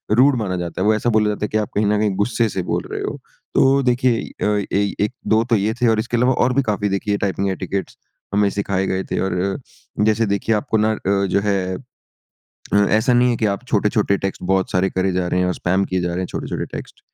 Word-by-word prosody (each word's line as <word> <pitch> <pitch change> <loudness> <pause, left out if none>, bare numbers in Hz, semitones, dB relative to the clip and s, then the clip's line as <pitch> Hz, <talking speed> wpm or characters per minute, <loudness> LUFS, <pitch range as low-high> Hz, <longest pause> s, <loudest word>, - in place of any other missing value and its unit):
Rude 135 +3 +5
माना 100 -5 -2
जाता 85 +1 -4
है। - - +1
वो 110 - +5
ऐसा 115 +3 0
बोला 110 -2 +3
जाता 105 0 -2
है - - -2
कि 110 - 0
आप 105 -1 -1
कहीं 105 - +2
न 105 +1 +2
कहीं 105 0 +2
गुस्से 110 +3 +1
से 95 - -3
बोल - - -2
रहे - - -3
हो। - - -3 0.4
तो 135 +1 +4
देखिए 125 -1 +2
इ - - -7
अ, 105 -1 +1
एइ 100 0 +1
1-2 110 0 +1
तो 115 - +4
ये 105 +1 +1
थे, 120 - +4
और 110 -1 +3
इसके 120 +2 -1
अलावा 125 +2 +3
और 125 0 +2
भी 140 - +3
काफ़ी 105 -3 -1
देखिए 100 +1 -1
टाइपिंग 100 0 -1
एटिकेट्स 95 +1 -4 0.4
हमें 100 0 +3
सिखाए 100 -1 -1
गए 95 0 -1
थे। - - 0
और 95 -1 -1
अ, 100 +2 -4
जैसे 110 +1 +2
देखिए 100 +2 0
आपको 110 +1 0
ना 110 +1 +2
अ, - - -5 0.3
जो 95 +1 +1
है 95 -2 0
अ, 130 +2 -14 0.9
ऐसा 110 +4 +3
नहीं 125 0 +4
है 120 - 0
कि 110 - 0
आप 110 - -10
छोटे-छोटे 105 -1 +2
टेक्स्ट 95 0 -4
बहुत 95 0 +1
सारे 95 +1 +2
करे 95 0 0
जा 90 0 0
रहे 90 - +1
हैं 90 - +2
और 90 - 0
स्पैम 95 +2 0
किए 95 -1 -1
जा 90 - -1
रहे 85 +1 -3
हैं 95 - -2
छोटे-छोटे - - -4
टेक्स्ट। - - -9
105 Hz, 250 wpm, -20 LUFS, 95-115 Hz, 0.9 s, Rude